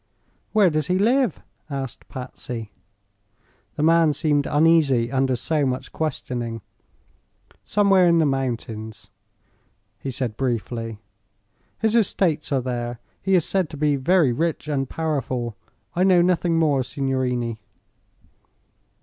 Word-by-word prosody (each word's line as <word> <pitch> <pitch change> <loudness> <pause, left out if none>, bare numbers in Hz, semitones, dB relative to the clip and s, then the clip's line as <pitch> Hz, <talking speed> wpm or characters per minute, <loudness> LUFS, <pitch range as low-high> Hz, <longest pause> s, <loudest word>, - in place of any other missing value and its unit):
"Where 205 -5 +4
does 155 0 0
he 180 0 +2
live?" 240 - +2 0.3
asked 135 -4 -5
Patsy. 125 -4 -7 1.0
The 150 - -1
man 165 -1 +4
seemed 145 -1 +1
uneasy 145 -6 +3
under 135 -1 +1
so 150 +4 0
much 130 -1 -2
questioning. 120 -7 -3 1.0
"Somewhere 195 -3 +4
in 170 -1 +4
the 160 - +4
mountains," 115 -5 -3 0.9
he 135 - -5
said, 125 -3 -3
briefly. 115 -3 -2 0.8
"His 220 0 +1
estates 180 -9 +1
are 135 -2 +2
there. 120 -1 -4 0.2
He 195 0 +2
is 175 - +3
said 190 -5 0
to 150 - -8
be 150 0 +2
very 150 +1 +3
rich 160 +4 -1
and 135 -3 -1
powerful. 130 -7 -2 0.4
I 180 - +2
know 185 -2 +5
nothing 175 -2 +2
more, 150 -5 +3
signorini." 125 -3 -2
145 Hz, 125 wpm, -23 LUFS, 125-165 Hz, 1.0 s, know